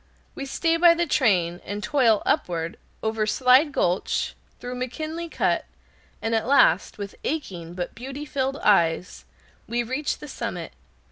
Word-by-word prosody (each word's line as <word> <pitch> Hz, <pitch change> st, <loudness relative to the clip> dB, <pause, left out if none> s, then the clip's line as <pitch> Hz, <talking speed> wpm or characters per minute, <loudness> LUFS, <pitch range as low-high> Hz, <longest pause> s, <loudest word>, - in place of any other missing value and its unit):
We 275 Hz, -, -6 dB
stay 330 Hz, +4 st, +1 dB
by 340 Hz, 0 st, +7 dB
the 345 Hz, +1 st, +1 dB
train, 185 Hz, -, +2 dB
and 205 Hz, +1 st, -5 dB
toil 240 Hz, -7 st, +3 dB
upward, 165 Hz, -1 st, -1 dB, 0.3 s
over 220 Hz, -1 st, 0 dB
Slide 260 Hz, +6 st, +4 dB
Gulch, 180 Hz, -7 st, 0 dB, 0.3 s
through 245 Hz, -, -6 dB
McKinley 310 Hz, +7 st, -4 dB
Cut, -, -, 0 dB, 0.6 s
and 225 Hz, -, 0 dB
at 225 Hz, 0 st, +1 dB
last, 260 Hz, -, +4 dB
with 200 Hz, -1 st, -6 dB
aching 175 Hz, -, -4 dB
but 180 Hz, -1 st, -4 dB
beauty 270 Hz, +4 st, -7 dB
filled 275 Hz, -1 st, -2 dB
eyes, 175 Hz, -3 st, +2 dB, 0.4 s
we 240 Hz, +1 st, 0 dB
reach 260 Hz, +5 st, -2 dB
the 300 Hz, -, -10 dB
summit. 210 Hz, -, -5 dB
240 Hz, 145 wpm, -25 LUFS, 190-285 Hz, 0.6 s, by